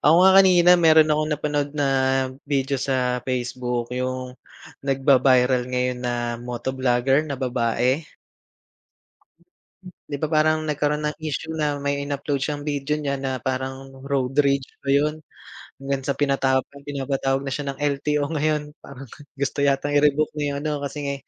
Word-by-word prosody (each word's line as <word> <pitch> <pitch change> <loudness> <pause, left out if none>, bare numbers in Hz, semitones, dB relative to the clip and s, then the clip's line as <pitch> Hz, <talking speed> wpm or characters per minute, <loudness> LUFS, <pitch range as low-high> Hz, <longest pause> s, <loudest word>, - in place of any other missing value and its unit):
Ako 150 +3 +5
nga 190 - +7
kanina 180 -2 +5
meron 155 -1 +6
akong 155 0 0
napanood 145 -1 -1
na 140 -1 +1 0.6
video 135 -1 0
sa 125 -2 0
Facebook, 125 -1 -3
yung 130 0 -3 0.5
nagba-viral 130 -2 +3
ngayon 125 0 -1
na 125 -1 -2 0.3
moto 120 +1 -4
vlogger 130 +2 +2
na 140 - -3
babae. 125 +1 0 2.1
Di 145 - -1
ba - - +2
parang 155 +1 +3
nagkaro'n 150 0 -1
ng 150 - -3
issue 155 +1 -4
na 150 -2 -1
may 140 0 -2
in-upload 140 0 -2
siyang 145 -1 -3
video 145 0 -1
niya 140 -2 -2
na 135 -1 -2
parang 130 +1 -4 0.2
road 135 -2 0
rage 140 -1 +1 0.2
ba 140 - -5
yun? 150 +3 +2 0.6
Hanggang 135 0 -3
sa 140 +1 -2
pinata 135 -2 +2 0.2
pinapatawag 135 -1 -1
na 135 - -3
siya 140 -1 -3
ng 135 - -13
LTO 145 0 0
ngayon. 150 0 -1
Parang 135 0 -11 0.3
gusto 140 +1 -2
yatang 140 +1 +1
i-revoke 150 +1 +3
na 150 - -2
yung 140 - -3
ano, 155 - 0
kasi 140 +1 -5
nga 140 - -1
140 Hz, 150 wpm, -23 LUFS, 130-150 Hz, 2.1 s, nga